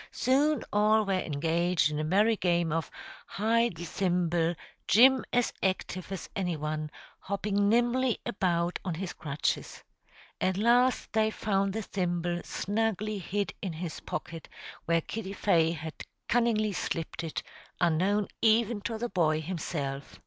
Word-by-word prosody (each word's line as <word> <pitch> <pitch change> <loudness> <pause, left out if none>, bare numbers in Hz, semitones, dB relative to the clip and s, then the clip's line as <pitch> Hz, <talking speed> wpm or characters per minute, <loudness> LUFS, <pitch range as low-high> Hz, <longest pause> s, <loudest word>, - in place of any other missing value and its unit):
Soon 280 +1 +2
all 215 +1 +4
were 195 - 0
engaged 165 0 +1
in 150 - -2
a - - -1
merry 205 +8 +3
game 175 -4 +1
of 165 0 -1 0.4
"hide 230 0 +1
the 170 +2 -6
thimble," 175 -2 0 0.3
Jim 255 +10 +6
as 245 -1 +1
active 185 -1 -2
as 195 - -5
any 180 -4 -1
one, 155 0 -3 0.3
hopping 200 +1 0
nimbly 240 +2 +2
about 175 -2 0
on 180 -4 -2
his 185 +2 -4
crutches. 145 -1 -3 0.6
At 185 0 +1
last 240 +3 +3
they 220 0 +3
found 195 -3 0
the 220 0 -3
thimble 175 -2 -1
snugly 215 0 -1
hid 200 +2 -2
in 190 -5 -3
his 165 0 -5
pocket, 165 -1 -6 0.4
where 165 0 +2
Kitty 195 +2 -5
Fay 170 -6 +3
had 160 -1 -6 0.3
cunningly 225 -3 +2
slipped 170 -2 -3
it, 160 - -4 0.4
unknown 185 +5 +2
even 225 -1 +3
to 225 +2 -3
the 240 +2 -2
boy 155 -7 +1
himself. 150 -4 -4
190 Hz, 140 wpm, -29 LUFS, 170-215 Hz, 0.6 s, Jim